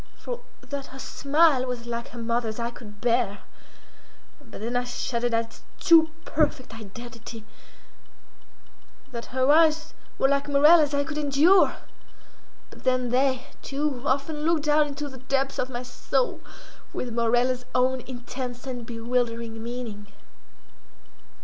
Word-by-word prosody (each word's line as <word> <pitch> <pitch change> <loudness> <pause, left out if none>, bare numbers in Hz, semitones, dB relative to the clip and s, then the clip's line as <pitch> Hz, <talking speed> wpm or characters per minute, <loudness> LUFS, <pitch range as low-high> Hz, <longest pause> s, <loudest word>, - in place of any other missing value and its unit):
For - - -5 0.2
that 280 -1 -6
her 265 - -11
smile 285 0 +3
was 245 -1 -4
like 235 0 -4
her 240 - -12
mother's 230 -1 -1
I 235 0 -2
could 210 -3 -12
bear; 235 -4 +1 1.0
but - - -11
then 235 +3 -3
I 245 - +2
shuddered 245 -1 -2
at 230 0 +1
its 225 - -17 0.2
too 330 -3 +6 0.2
perfect 295 -5 0
identity—that 225 +1 -9 1.8
her 260 +2 +2
eyes 315 0 +4 0.2
were 270 - +3
like 280 0 +1
Morella's 295 +1 +6
I 285 - +2
could 300 +1 -4
endure; 300 +6 +5 1.0
but - - -14
then 255 -1 +1
they, 260 +1 +2 0.2
too, 280 -2 -2
often 280 +3 0
looked 315 0 +1
down 300 0 +4
into 290 +1 -5
the 265 -2 -10
depths 270 +1 -1
of 255 - 0
my 245 -1 -4
soul 255 +1 -1 0.5
with 245 -2 -3
Morella's 245 +2 +2
own 255 0 +2
intense 250 0 -6
and 245 -3 -5
bewildering 230 -1 -2
meaning. 230 -3 -6
255 Hz, 135 wpm, -26 LUFS, 235-285 Hz, 1.8 s, too